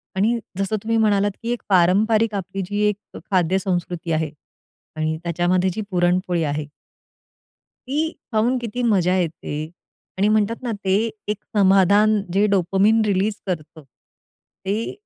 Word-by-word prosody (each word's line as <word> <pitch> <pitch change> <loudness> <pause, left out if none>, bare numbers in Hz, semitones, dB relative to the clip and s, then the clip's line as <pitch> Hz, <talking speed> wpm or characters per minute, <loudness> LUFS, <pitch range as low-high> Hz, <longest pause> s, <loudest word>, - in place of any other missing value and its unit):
आणि 225 +5 +2 0.2
जसं 195 +2 -1
तुम्ही 225 +1 0
म्हणालात 205 -2 +2
की 235 - -2
एक 240 - -2
पारंपारिक 210 +5 +3
आपली 195 0 -4
जी 205 0 -1
एक 205 - -1 0.2
ख - - -6
खाद्यसंस्कृती 180 -1 0
आहे 155 -2 0 0.6
आणि 155 0 -1
त्याच्यामध्ये 175 +2 +1
जी 215 - -3
पुरणपोळी 175 -1 +1
आहे. 150 0 -2 1.2
ती 305 +4 0 0.2
पाहून 230 +4 +2
किती 240 +1 -4
मजा 185 -6 +2
येते 165 -4 -3 0.6
आणि 200 +2 +2
म्हणतात 215 +1 +1
ना, 240 - -2
ते 190 0 +3 0.3
एक 210 - -1 0.2
समाधान 200 +2 +4
जे 200 +2 +3
डोपामाइन 195 +4 +3
रिलीज 200 +1 +1
करतं. 160 -3 -5
ते 195 - -8
195 Hz, 135 wpm, -22 LUFS, 175-215 Hz, 1.2 s, समाधान